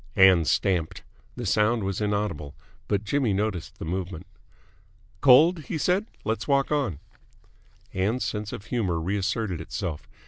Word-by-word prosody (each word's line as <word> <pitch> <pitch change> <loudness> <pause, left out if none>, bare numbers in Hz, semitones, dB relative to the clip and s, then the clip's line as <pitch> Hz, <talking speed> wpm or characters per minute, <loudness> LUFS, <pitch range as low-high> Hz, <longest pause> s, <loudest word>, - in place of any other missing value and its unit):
Ann 95 -4 +6
stamped. 90 -1 0 0.3
The 120 - -5
sound 105 +3 +2
was 95 +1 -2
inaudible, 100 -9 -2 0.3
but 100 0 0
Jimmy 120 0 +1
noticed 100 -3 -2
the - - -6
movement. 90 0 -4 1.0
"Cold?" 155 +4 +6
he 165 - -3
said. 185 +7 +1 0.2
"Let's 110 -1 -2
walk 140 0 +2
on." 140 - 0 1.0
Ann's 105 +7 0
sense 105 -1 -3
of 100 - -7
humour 105 -8 -1
reasserted 100 0 -1
itself. 80 -2 -5
105 Hz, 135 wpm, -26 LUFS, 95-120 Hz, 1.0 s, Ann